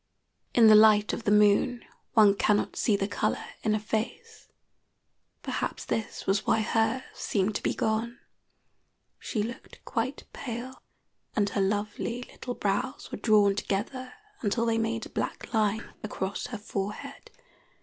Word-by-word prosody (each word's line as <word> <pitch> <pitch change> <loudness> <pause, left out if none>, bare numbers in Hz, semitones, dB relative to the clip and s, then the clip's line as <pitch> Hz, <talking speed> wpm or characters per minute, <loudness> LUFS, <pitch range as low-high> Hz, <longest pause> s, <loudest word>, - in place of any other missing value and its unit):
In 235 - +7
the 220 - +9
light 210 -1 +6
of 230 - -4
the 205 - +3
moon 210 +4 +4 0.3
one 210 -3 +7
cannot 205 +1 +1
see 215 - +2
the 195 0 0
color 205 - -1 0.2
in 215 -1 +1
a - - 0
face. 225 - -4 1.0
Perhaps - - -3
this 220 - -3
was 195 +1 +1
why 220 - +2
hers 225 +4 +1
seemed 200 +1 0
to - - -10
be - - 0
gone. 225 +3 -1 1.0
She 215 - -2
looked 240 +4 -8
quite 255 +3 -2
pale, 250 0 -6 0.5
and 205 -2 +2
her 200 - -1
lovely 210 +4 -1
little 245 0 -7
brows 205 +6 -2
were - - -5
drawn 210 -3 +4
together 250 +7 -3 0.3
until 230 +2 +1
they 225 -1 +1
made 225 0 -1
a - - -10
black - - -4
line 220 0 0
across 200 -2 -3
her 235 - -5
forehead. 205 0 -5
220 Hz, 150 wpm, -28 LUFS, 205-235 Hz, 1.0 s, the